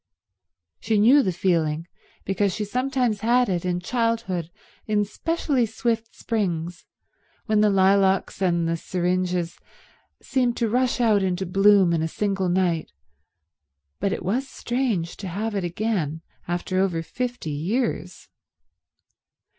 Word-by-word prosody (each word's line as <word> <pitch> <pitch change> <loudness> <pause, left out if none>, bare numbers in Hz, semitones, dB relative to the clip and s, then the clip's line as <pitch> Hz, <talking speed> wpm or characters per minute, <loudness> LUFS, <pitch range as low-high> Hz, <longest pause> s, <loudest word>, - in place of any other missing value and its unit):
She 220 0 0
knew 245 +8 +6
the 190 - 0
feeling, 165 -3 0 0.4
because 195 0 0
she 215 - -2
had 205 - -8
sometimes 250 -3 0
had 240 +3 +3
it 175 -2 -1
in 180 -1 0
childhood 230 -5 -1 0.4
in 210 -1 +2
specially 275 +1 -1
swift 225 +1 -2
springs, 175 -6 -3 0.6
when 215 -2 +2
the 210 - +5
lilacs 195 0 +3
and 170 -3 +2
the 165 0 0
syringes 180 0 -1 0.6
seemed 250 -3 0
to 230 - +1
rush 250 +3 +1
out 220 -4 +4
into 190 0 -1
blossom 195 -1 +4
in 165 - +1
a 160 - 0
single 195 +1 -1
night, 175 -3 0 1.1
but 200 - 0
it - - -4
was 250 +9 0
strange 240 -11 -2
to 195 - -6
have 210 +5 -3
it 200 -2 -1
again 175 -4 -2 0.2
after 175 +2 -1
over 180 -4 0
fifty 245 -4 -4
years. 200 - -2
195 Hz, 135 wpm, -24 LUFS, 175-230 Hz, 1.1 s, knew